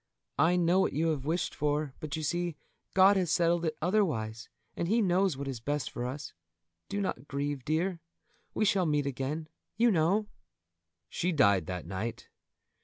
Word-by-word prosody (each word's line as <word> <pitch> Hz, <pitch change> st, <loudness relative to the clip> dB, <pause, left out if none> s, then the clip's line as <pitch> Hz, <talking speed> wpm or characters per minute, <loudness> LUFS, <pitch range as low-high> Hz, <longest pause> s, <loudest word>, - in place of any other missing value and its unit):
I 175 Hz, +2 st, +5 dB
know 175 Hz, +1 st, +3 dB
what -, -, +2 dB
you 165 Hz, +3 st, +1 dB
have 145 Hz, -4 st, -2 dB
wished 165 Hz, +4 st, -1 dB
for, 150 Hz, -1 st, -1 dB
but 155 Hz, 0 st, -4 dB
you 160 Hz, -, -4 dB
see 175 Hz, +1 st, -1 dB, 0.4 s
God 190 Hz, +1 st, +7 dB
has 180 Hz, -3 st, +1 dB
settled 170 Hz, 0 st, +2 dB
it 155 Hz, -1 st, -2 dB
otherwise, 125 Hz, -, 0 dB, 0.3 s
and 170 Hz, -, -2 dB
He 225 Hz, +6 st, +3 dB
knows 185 Hz, -, +2 dB
what 140 Hz, 0 st, -5 dB
is 130 Hz, -4 st, -4 dB
best 145 Hz, +4 st, -2 dB
for 120 Hz, -, -3 dB
us. 135 Hz, +2 st, -6 dB, 0.6 s
Do 200 Hz, -, -2 dB
not 145 Hz, -8 st, -3 dB
grieve, 140 Hz, -1 st, -3 dB
dear; 165 Hz, +5 st, 0 dB, 0.6 s
we 215 Hz, -, +2 dB
shall 190 Hz, -3 st, +2 dB
meet 150 Hz, -2 st, +1 dB
again, 140 Hz, +4 st, -3 dB, 0.3 s
you 235 Hz, +1 st, +5 dB
know!" 190 Hz, +5 st, +2 dB, 0.8 s
She 180 Hz, -, -1 dB
died 100 Hz, -, +3 dB
that 90 Hz, -2 st, -4 dB
night. 95 Hz, +6 st, -5 dB
155 Hz, 175 wpm, -30 LUFS, 135-180 Hz, 0.8 s, God